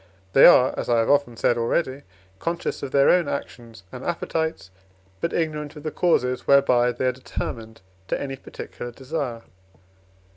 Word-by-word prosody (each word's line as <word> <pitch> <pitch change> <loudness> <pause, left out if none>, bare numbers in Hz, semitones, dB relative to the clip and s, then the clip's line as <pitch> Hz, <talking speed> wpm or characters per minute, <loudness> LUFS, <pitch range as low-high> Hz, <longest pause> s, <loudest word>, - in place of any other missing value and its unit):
They 135 - +9
are, 130 -7 +6
as - - -4
I 120 - +3
have 115 +4 +2
often 140 -5 +1
said 120 +1 +1
already, 130 +3 -1 0.4
conscious 170 +1 -3
of 140 - -4
their 140 +1 +4
own 175 -4 +3
actions 115 -7 -6
and 130 0 -8
appetites, 160 - -3 0.5
but 170 - -2
ignorant 155 -2 -2
of 150 - -10
the 155 - -3
causes 125 -8 0
whereby 125 -3 +4
they 120 +2 -3
are 130 - +3
determined 115 -3 -7 0.3
to - - -1
any 135 -1 -4
particular 120 -2 -9
desire. 130 -3 -5
135 Hz, 160 wpm, -24 LUFS, 120-150 Hz, 0.5 s, They